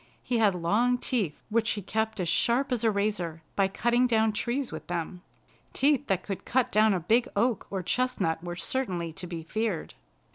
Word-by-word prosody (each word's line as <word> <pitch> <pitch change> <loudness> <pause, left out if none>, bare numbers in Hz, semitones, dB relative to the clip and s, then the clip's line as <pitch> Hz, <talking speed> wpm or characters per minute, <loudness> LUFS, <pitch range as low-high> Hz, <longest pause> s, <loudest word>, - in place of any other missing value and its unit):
He 240 -2 0
had 205 -4 +4
long 215 +9 +2
teeth, 215 - -1
which 225 0 +1
he 205 - -5
kept 220 +2 -2
as 180 - -1
sharp 240 +11 +2
as 240 -2 0
a 225 - +4
razor 200 -6 -1
by 195 -1 +3
cutting 240 +5 +2
down 220 -2 +2
trees 240 +5 -2
with 155 - -7
them. 175 +1 -4 0.5
Teeth 285 0 +2
that 190 -2 0
could 195 -3 -5
cut 255 0 +1
down 215 -1 +4
a - - 0
big 225 +8 +2
oak 230 +1 +1
or 190 -2 -3
chestnut 180 -7 0
were 175 0 -4
certainly 175 -4 -2
to 180 +2 -6
be 170 -2 -6
feared. 215 0 -2
210 Hz, 190 wpm, -28 LUFS, 180-240 Hz, 0.5 s, had